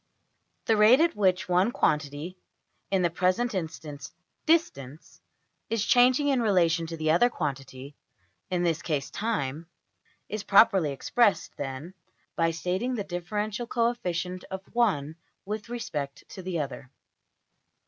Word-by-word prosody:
The 225 - +3
\emph{rate} 220 +5 +6
at 330 +1 +3
which 190 -3 +1
one 180 +5 +3
quantity 150 +1 -1 0.5
(in 190 -2 +1
the 170 - +2
present 185 +8 +1
instance, 155 -5 -6 0.4
\emph{distance}) 155 - 0 0.5
is 220 -1 0
changing 255 +4 +4
in 265 -3 +2
relation 170 -6 +2
to 165 0 -6
the 155 0 +1
other 210 +10 +4
quantity 135 - -5 0.5
(in 180 -1 0
this 170 -1 0
case, 140 -5 -2
\emph{time}) 160 -8 -3 0.6
is 215 +1 -4
properly 195 -5 +5
expressed, 210 - +1
then, 140 +5 -6 0.4
by 165 0 +2
stating 185 +9 -2
the 210 - -2
differential 210 +5 -3
coefficient 185 -7 -1
of 190 0 -6
one 160 -11 +1 0.3
with 210 +3 -5
respect 155 -13 -5
to 190 - -9
the 180 -2 -3
other. 135 -3 -5
180 Hz, 130 wpm, -27 LUFS, 155-220 Hz, 0.6 s, emph{rate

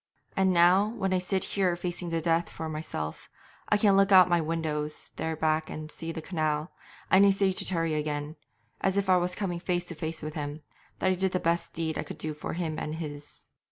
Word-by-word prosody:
'And 190 -1 +3
now, 180 +3 +5
when 190 -3 0
I 185 - +3
sit 185 +1 -1
here 185 -3 +1
facing 175 0 -3
the 165 -1 -1
death 165 +1 +1
for 160 - -6
myself, 155 - -5 0.4
I 210 - +4
can 205 -2 +4
look 195 +1 +4
out 185 -1 +9
of - - -8
my 170 -1 +4
windows 155 -2 -3
there 160 0 -2
back 155 0 0
and 155 0 -6
see 165 +1 -4
the 160 -1 -6
canal, 155 -2 -1 0.4
and 190 +1 +7
I 200 - +7
say 195 0 +3
to - - 0
Terry 165 -3 0
again, 150 0 -2 0.5
as 190 0 +1
if 195 -1 +2
I 185 - +6
was 180 0 0
coming 180 -4 -2
face 175 0 -1
to 175 - -3
face 160 0 -4
with 155 0 -4
him, 150 0 -5 0.3
that 185 - +2
I - - +3
did 190 0 -1
the 185 - +1
best 170 0 0
deed 160 -1 -2
I - - -1
could 150 - -8
do 155 -1 -3
for 150 - -5
him 160 -2 -2
and 155 - -4
his. 145 -3 -7
165 Hz, 230 wpm, -28 LUFS, 155-185 Hz, 0.5 s, out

